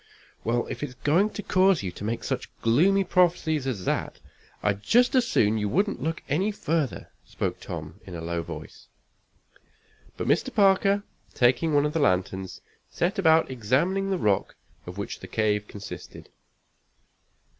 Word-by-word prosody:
"Well, 120 +1 0
if - - -6
it's 140 -4 -5
going 160 +11 +2
to 210 - -7
cause 185 - +3
you 90 - -3
to 95 - -10
make 115 +3 -2
such - - -3
gloomy 180 +13 +4
prophecies 165 -6 +2
as 100 -9 -3
that, - - -2 0.4
I'd 100 -1 0
just 245 - +3
as 255 -3 +3
soon 110 +1 +2
you 105 -1 -1
wouldn't 200 - 0
look 165 +1 -3
any 185 +10 +1
further," 160 - -2
spoke - - -4
Tom, 80 +2 -7
in 90 - -7
a 85 - -6
low 85 0 -2
voice. 80 -2 -9 1.3
But - - -3
Mr. - - +1
Parker, 200 0 +3 0.3
taking 130 +6 +3
one 145 0 +4
of 150 - -1
the 165 - 0
lanterns, 95 -5 0 0.3
set 180 +3 -1
about 160 -5 +4
examining 150 - 0
the 190 - +1
rock 105 - 0 0.3
of 90 +2 -8
which 100 - -5
the - - -9
cave 105 -1 0
consisted. 105 0 -9
140 Hz, 160 wpm, -26 LUFS, -, 1.3 s, gloomy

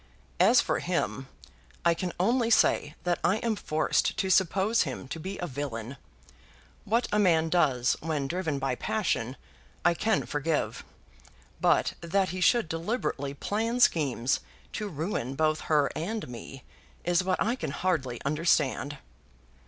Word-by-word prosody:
As - - +6
for - - -1
him, - - -2 0.6
I 170 - +5
can 175 +2 -3
only 230 +5 +2
say, 150 -8 +3
that 175 -1 0
I 190 - +3
am 225 -1 -1
forced 155 -5 0
to 190 - 0
suppose 190 +5 +3
him 135 -3 -3
to 165 - -5
be 190 +5 -5
a 180 - -3
villain. 130 -4 -5 0.9
What 230 +4 +1
a 210 - +2
man 165 -5 +3
does 135 -8 +2
when 150 -3 -2
driven 165 -2 -2
by 135 -1 -1
passion, 130 - -1 0.5
I 175 - +5
can 220 +4 0
forgive; 150 +1 -1 0.8
but - - +3
that 185 +3 +1
he 185 +1 -4
should 235 +2 +4
deliberately 165 - -2
plan 225 - -1
schemes 135 - +2 0.3
to 210 - -3
ruin 155 - -3
both 155 +1 +1
her 150 -3 +3
and 210 +7 -3
me, 125 +2 -9 0.4
is 175 +1 +2
what 185 0 0
I 235 +3 +1
can 260 - -4
hardly 140 -6 -1
understand." 145 -1 +1
165 Hz, 145 wpm, -28 LUFS, 140-195 Hz, 0.9 s, As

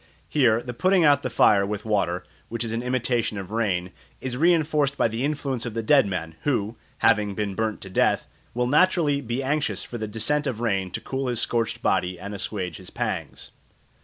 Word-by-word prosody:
Here 120 - +3
the 125 - -5
putting 185 +6 +3
out 145 -1 +5
the 130 - -2
fire 100 -4 +4
with 105 +1 -4
water, 90 -5 0 0.2
which 115 +1 -2
is 115 - -3
an 115 +1 -1
imitation 125 -3 0
of 95 0 -6
rain, 95 -5 -1 0.3
is 130 -1 -4
reinforced 150 -2 +2
by - - +3
the 115 +3 -3
influence 140 -4 -2
of 120 -2 -5
the 115 - -2
dead 135 0 +5
man, 80 -4 -4
who, 115 -6 0 0.2
having 105 -3 +3
been 105 -1 -2
burnt 110 +1 -2
to 95 - -8
death, - - +2 0.3
will 125 0 +1
naturally 150 0 +3
be 120 +1 -3
anxious 145 +2 0
for 120 - -7
the 110 - -3
descent 140 +8 0
of 120 -5 -3
rain 100 -5 0
to - - -5
cool 135 0 -3
his 120 -2 0
scorched 115 -2 0
body 90 -1 +1
and 100 +3 -6
assuage 95 -4 -4
his - - -10
pangs. - - -4
115 Hz, 200 wpm, -25 LUFS, 105-135 Hz, 0.3 s, out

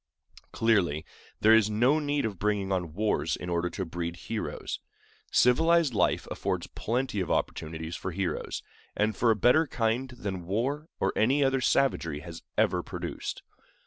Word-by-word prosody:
Clearly, 90 -10 +2 0.4
there 110 +1 +7
is 110 -2 +5
no 125 +8 +3
need 145 -2 0
of 100 -5 -4
bringing 105 -2 0
on 90 -4 -2
wars 105 +2 +1
in 90 - -6
order 85 0 0
to 95 +2 -4
breed 85 0 -4
heroes. 85 - -4 0.5
Civilized 160 +3 +4
life - - +1
affords - - -2
plenty 120 -1 -2
of 90 - -2
opportunities 80 +1 -2
for 95 - -4
heroes, 95 0 -3 0.3
and 105 0 +1
for 120 - +2
a 110 - +5
better 125 - +4
kind 120 +2 0
than 100 -8 -5
war 135 - -1
or - - +1
any 135 +6 +3
other 135 -1 +2
savagery 85 - +1
has 85 +1 -9 0.2
ever - - +3
produced. - - -5
105 Hz, 155 wpm, -28 LUFS, 90-125 Hz, 0.5 s, there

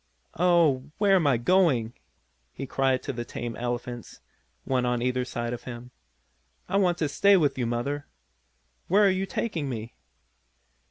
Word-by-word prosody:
"Oh, 165 -7 +3
where 200 -1 +3
am 170 -6 +3
I 135 -4 +3
going?" 125 -5 +2 0.6
he 135 - -6
cried 135 -1 0
to - - -4
the 120 -1 -4
tame 120 -1 -6
elephants, 120 -1 -5 0.4
one 130 -2 0
on 125 -1 0
either 125 0 0
side 120 -1 -4
of 120 - -7
him. 125 0 -8 0.8
"I 195 - 0
want 180 -3 +2
to 160 - 0
stay 200 +8 +4
with 150 -5 +2
you, 125 -3 -1
Mother! 140 +5 -3 0.8
Where 205 +3 +4
are 195 - +5
you 190 +1 -1
taking 165 - -3
me?" 115 -2 -6
130 Hz, 160 wpm, -26 LUFS, 120-175 Hz, 0.8 s, are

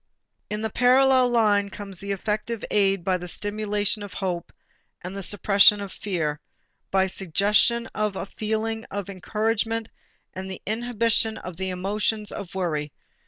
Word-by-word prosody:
In 210 +1 -3
a - - 0
parallel 255 +1 +5
line 210 -4 +3
comes 195 0 -7
the 200 0 -3
effective 210 +3 -2
aid 195 -3 +3
by 185 0 +1
the 180 0 -7
stimulation 210 +2 -1
of 205 -2 -8
hope 180 -3 -3 0.5
and 180 +2 -6
the 200 - -4
suppression 205 +1 +5
of 200 -2 -6
fear, 155 -7 -2 0.5
by 190 0 +3
suggestion 200 +6 +2
of 210 -2 -1
a - - -3
feeling 220 +2 -2
of 200 -1 -5
encouragement 220 +4 -1 0.4
and 190 +1 -6
the 190 - -6
inhibition 225 0 +1
of 180 -2 -8
the 190 0 -2
emotions 210 +3 -1
of 195 -3 -7
worry. 155 -6 -1
205 Hz, 150 wpm, -25 LUFS, 190-220 Hz, 0.5 s, parallel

